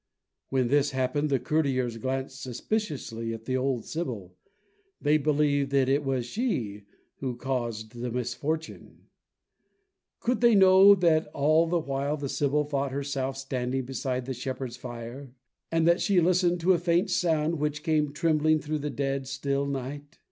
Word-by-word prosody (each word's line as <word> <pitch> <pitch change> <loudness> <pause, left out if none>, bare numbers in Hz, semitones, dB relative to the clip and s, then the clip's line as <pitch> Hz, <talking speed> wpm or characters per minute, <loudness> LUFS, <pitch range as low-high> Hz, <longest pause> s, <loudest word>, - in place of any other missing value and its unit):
When 130 -3 +1
this 145 +1 +3
happened, 140 +4 0
the 135 - +3
courtiers 130 -3 0
glanced 130 +2 -4
suspiciously 125 - -3
at 115 0 -12
the 130 - -1
old 130 -3 -1
sibyl. 115 - -5 0.6
They 150 +1 +3
believed 145 -1 +1
that 135 -2 +3
it 140 +2 +2
was 130 -3 -1
she 120 - -3 0.3
who 130 -3 -3
caused 120 -4 -3
the 120 +1 -5
misfortune. 145 +6 -4 1.1
Could 245 0 -1
they 235 -2 +6
know 190 +1 +8
that 165 -4 +2
all 155 +4 +3
the 175 +1 +1
while 140 -1 -2
the 140 -2 -4
sibyl 145 +2 +1
thought 140 -2 -2
herself 135 -1 -3
standing 130 -1 -2
beside 130 -1 -3
the 130 - -3
shepherds' 130 0 -5
fire, 125 +2 -8 0.4
and 165 0 +2
that 170 0 +4
she 195 -3 +3
listened 175 0 +2
to 185 +3 +4
a 175 - +1
faint 175 +3 +1
sound 165 -2 +1
which 150 0 -2
came 155 -3 +1
trembling 155 0 +2
through 155 0 -3
the 150 +1 -3
dead 135 -1 -2
still 140 +1 -1
night? 140 +3 -5
140 Hz, 155 wpm, -27 LUFS, 130-155 Hz, 1.1 s, know